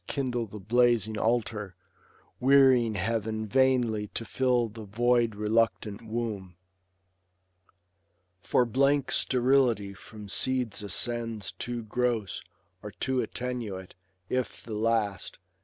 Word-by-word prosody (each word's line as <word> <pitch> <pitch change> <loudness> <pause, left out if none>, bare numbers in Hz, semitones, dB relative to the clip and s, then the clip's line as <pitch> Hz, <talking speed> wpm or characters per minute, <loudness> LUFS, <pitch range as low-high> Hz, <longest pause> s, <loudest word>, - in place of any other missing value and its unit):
Kindle 125 -4 -2
the 105 - -9
blazing 115 0 +2
altar, 110 -5 -1 0.6
wearying 130 -4 +5
heav'n 110 +2 -1
Vainly, 120 -3 +2
to 115 - -2
fill 125 +1 +1
the 110 +1 -10
void 120 +1 +2
reluctant 105 -1 0
womb. 110 -5 -4 1.9
For 125 - +2
blank 140 +3 +2
sterility 125 -6 +2
from 105 +2 -11
seeds 125 0 0
ascends 115 +1 -2
Too 120 -1 -5
gross, 115 -2 -1 0.4
or 105 - -7
too 130 +3 0
attenuate; 115 -7 -5 0.3
if 125 +1 -2
the 115 - -7
last. 110 -2 -1
115 Hz, 105 wpm, -28 LUFS, 105-125 Hz, 1.9 s, wearying